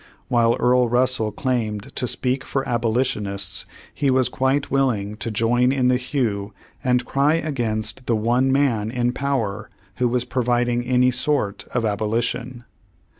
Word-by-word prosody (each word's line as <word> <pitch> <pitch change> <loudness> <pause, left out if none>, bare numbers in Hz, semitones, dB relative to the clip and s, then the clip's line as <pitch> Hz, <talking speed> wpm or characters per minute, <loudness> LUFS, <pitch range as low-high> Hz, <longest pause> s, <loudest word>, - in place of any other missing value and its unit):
While 120 -2 +3
Earl 125 0 +3
Russel 120 -2 +1
claimed 110 -3 -2
to 125 - -1
speak 130 +2 -1
for 135 -1 -2
abolitionists, 110 -5 -1 0.3
he 140 -1 0
was 130 -2 +3
quite 130 +2 0
willing 115 -7 0
to 115 - -4
join 120 +3 +2
in 130 -2 +2
the 125 - +3
hue 115 -6 -2 0.3
and 125 -2 +2
cry 140 +5 +2
against 120 -6 -2
the 115 - +2
one 120 +5 +2
man 125 -6 +1
in 120 0 0
power 115 -7 -2 0.3
who 125 - +2
was 125 0 0
providing 120 -1 0
any 125 0 +3
sort 125 -5 -1
of 120 -2 0
abolition. 115 +3 -2
125 Hz, 145 wpm, -22 LUFS, 110-130 Hz, 0.3 s, While